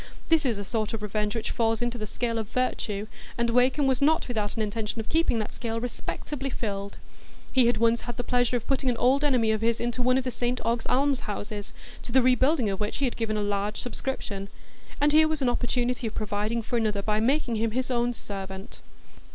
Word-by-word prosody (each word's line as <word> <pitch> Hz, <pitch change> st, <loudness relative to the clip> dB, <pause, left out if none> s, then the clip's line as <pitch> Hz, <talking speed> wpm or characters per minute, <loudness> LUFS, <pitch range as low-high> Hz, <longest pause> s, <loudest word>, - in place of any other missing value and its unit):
That 320 Hz, -4 st, +4 dB
is 230 Hz, -4 st, 0 dB
a 205 Hz, -, -5 dB
sort 215 Hz, +1 st, -2 dB
of 215 Hz, -, -6 dB
revenge 210 Hz, +1 st, -1 dB
which 225 Hz, -, -2 dB
falls 225 Hz, -1 st, +1 dB
into 240 Hz, 0 st, -2 dB
the 215 Hz, -, -4 dB
scale 230 Hz, +1 st, -1 dB
of 215 Hz, -2 st, -4 dB
virtue, 215 Hz, -5 st, -1 dB, 0.3 s
and 235 Hz, 0 st, +1 dB
Wakem 255 Hz, +4 st, +3 dB
was 265 Hz, -1 st, +2 dB
not 315 Hz, +3 st, +3 dB
without 215 Hz, -4 st, -2 dB
an 225 Hz, -, 0 dB
intention 210 Hz, +1 st, -3 dB
of 220 Hz, -, -5 dB
keeping 325 Hz, -7 st, +2 dB
that 215 Hz, -2 st, -3 dB
scale 230 Hz, -1 st, -3 dB
respectably 270 Hz, +3 st, -4 dB
filled. 200 Hz, -5 st, -4 dB, 0.6 s
He 255 Hz, -3 st, +5 dB
had 240 Hz, -, +2 dB
once 230 Hz, 0 st, +3 dB
had 240 Hz, -1 st, -6 dB
the 245 Hz, -, -2 dB
pleasure 245 Hz, 0 st, +2 dB
of 235 Hz, -, -8 dB
putting 270 Hz, -1 st, +1 dB
an 240 Hz, -, 0 dB
old 265 Hz, +5 st, +3 dB
enemy 250 Hz, -6 st, +3 dB
of 220 Hz, -1 st, 0 dB
his 230 Hz, 0 st, +1 dB
into 240 Hz, +1 st, -1 dB
one 255 Hz, +1 st, +4 dB
of 265 Hz, -, +1 dB
the 255 Hz, -, -2 dB
St 245 Hz, +1 st, -1 dB
Ogg's 230 Hz, 0 st, 0 dB
alms 275 Hz, 0 st, +2 dB
houses, 205 Hz, 0 st, -5 dB, 0.3 s
to -, -, -7 dB
the 260 Hz, +1 st, +5 dB
rebuilding 255 Hz, +1 st, +3 dB
of 195 Hz, -1 st, -2 dB
which 210 Hz, 0 st, -2 dB
he 280 Hz, -, +1 dB
had 245 Hz, -, -1 dB
given 215 Hz, -2 st, -1 dB
a 210 Hz, -, 0 dB
large 205 Hz, +1 st, -1 dB
subscription; 215 Hz, -6 st, -4 dB, 0.5 s
and 290 Hz, +1 st, +4 dB
here 315 Hz, 0 st, +7 dB
was 310 Hz, -3 st, -1 dB
an 250 Hz, -, +3 dB
opportunity 245 Hz, 0 st, 0 dB
of 215 Hz, -, -6 dB
providing 215 Hz, +2 st, -1 dB
for 240 Hz, +2 st, -1 dB
another 210 Hz, -3 st, 0 dB
by 210 Hz, 0 st, +1 dB
making 245 Hz, 0 st, +1 dB
him 225 Hz, +1 st, +1 dB
his 255 Hz, +3 st, -2 dB
own 240 Hz, 0 st, +2 dB
servant. 195 Hz, -1 st, -7 dB
235 Hz, 225 wpm, -27 LUFS, 215-255 Hz, 0.6 s, here